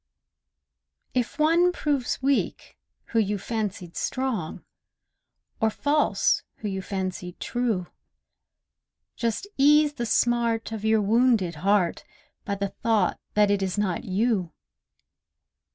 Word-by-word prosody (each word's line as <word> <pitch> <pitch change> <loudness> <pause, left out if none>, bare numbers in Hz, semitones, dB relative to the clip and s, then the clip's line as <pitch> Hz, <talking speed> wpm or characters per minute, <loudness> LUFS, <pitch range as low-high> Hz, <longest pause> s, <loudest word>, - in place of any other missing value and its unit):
If 250 +2 -1
one 335 +4 +4
proves 285 -7 -1
weak 275 0 0 0.3
who 230 - +1
you 205 -1 +1
fancied 200 -4 -4
strong, 255 -11 -3 0.9
Or 220 - +3
false 290 +6 +1
who 215 - -6
you 190 -1 -3
fancied 185 -2 -4
true, 235 -7 -1 1.3
Just 230 - -2
ease 295 +1 +5
the 235 -4 -3
smart 230 0 +1
of 220 -2 -5
your 220 0 +3
wounded 225 -4 +3
heart 195 -2 +2 0.4
By 200 - -1
the 200 0 -2
thought 215 -3 0 0.2
that 210 -1 +4
it 200 -1 +1
is 190 0 -2
not 195 -4 -1
you! 195 -3 0
220 Hz, 115 wpm, -26 LUFS, 195-245 Hz, 1.3 s, ease